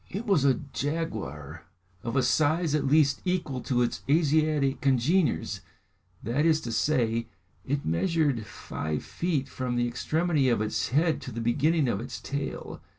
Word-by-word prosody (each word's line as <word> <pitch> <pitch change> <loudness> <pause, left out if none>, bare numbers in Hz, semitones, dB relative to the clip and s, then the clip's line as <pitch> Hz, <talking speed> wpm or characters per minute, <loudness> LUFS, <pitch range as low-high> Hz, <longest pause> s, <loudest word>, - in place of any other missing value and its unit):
It 205 +6 -5
was 195 - +3
a 135 -2 +4
jaguar 110 - -4 0.4
of 115 +4 -4
a 130 - +3
size 155 +4 +2
at 145 -2 +1
least 140 -1 +3
equal 175 -8 -1
to 125 -2 +1
its 120 - -2
Asiatic 150 -2 +2
congeners, 135 - +1 0.6
that 125 +7 0
is 160 -1 +4
to 120 - -5
say, 115 -2 +1 0.4
it 140 +1 -2
measured 140 - +1
five 75 -4 -4
feet 155 -6 -2
from 130 -2 -3
the 120 0 +1
extremity 155 +2 +1
of 120 - +2
its 110 0 -1
head 155 +5 +2
to 130 - -7
the 115 - -5
beginning 145 +6 +2
of 110 -3 -1
its 125 - -6
tail. 140 0 -5
140 Hz, 155 wpm, -27 LUFS, 120-155 Hz, 0.6 s, a